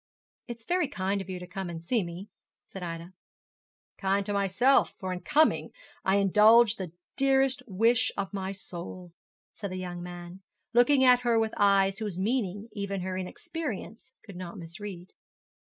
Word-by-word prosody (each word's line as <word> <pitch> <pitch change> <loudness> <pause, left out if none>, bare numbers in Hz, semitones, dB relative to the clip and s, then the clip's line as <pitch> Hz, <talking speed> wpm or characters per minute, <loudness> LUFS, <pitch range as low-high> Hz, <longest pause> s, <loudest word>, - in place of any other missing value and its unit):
'It 240 -2 -6
was 225 - -22
very 355 -3 +1
kind 200 -5 -2
of 190 - -9
you 185 - -4
to 180 - -8
come 190 +1 -5
to 170 -1 -5
see 210 +8 0
me,' 175 +3 -7 0.4
said 190 - -10
Ida. 170 +1 -6 0.9
'Kind 195 0 +1
to 205 - -2
myself, 200 +7 +3
for 185 -4 -3
in 180 - -4
coming 300 - +3 0.3
I 190 - +3
indulged 210 +3 +5
the 185 -4 -5 0.2
dearest 270 0 +3
wish 230 +5 +2
of 195 0 -3
my 190 -1 -3
soul,' 180 -2 -8 0.4
said 200 - -6
the 185 - -5
young 180 -1 -5
man, 175 +1 -9 0.3
looking 260 +3 +5
at 250 -1 +7
her 240 -2 +2
with 225 -1 +1
eyes 195 -1 +3
whose 210 -5 -4
meaning 205 -1 -1
even 200 -2 -3
her 185 +1 -3
inexperience 225 - -6
could 200 -4 -11
not 175 -1 -7
misread. 175 +2 -8
195 Hz, 170 wpm, -28 LUFS, 185-230 Hz, 0.9 s, at